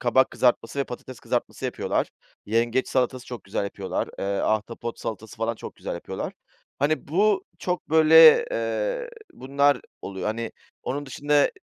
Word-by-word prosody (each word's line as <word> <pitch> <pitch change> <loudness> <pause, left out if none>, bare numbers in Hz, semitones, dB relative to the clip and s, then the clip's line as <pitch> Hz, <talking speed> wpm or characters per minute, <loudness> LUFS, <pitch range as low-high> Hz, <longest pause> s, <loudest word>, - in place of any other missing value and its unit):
kabak 130 +2 +3
kızartması 125 +1 +1
ve 140 - +2
patates 125 +1 -9
kızartması - - -3
yapıyorlar. - - -1 0.4
Yengeç 115 +4 +1
salatası 130 -1 0
çok 120 -2 -7
güzel 100 +1 -2
yapıyorlar, 100 -1 -3
eee, - - -2
ahtapot 110 +4 -1
salatası 110 -1 -6
falan 115 +1 -1
çok - - -9
güzel - - -5
yapıyorlar. - - -5 0.5
Hani, 145 +1 0
bu 200 +5 +2
çok, 180 -3 -3
böyle, 160 - +8
eee - - -1 0.2
Bunlar 140 +2 +2 0.2
oluyor, 95 +1 -5
hani. 115 +1 -2 0.3
Onun 145 +2 -3
dışında, 145 +2 +2
130 Hz, 145 wpm, -25 LUFS, 115-155 Hz, 0.5 s, böyle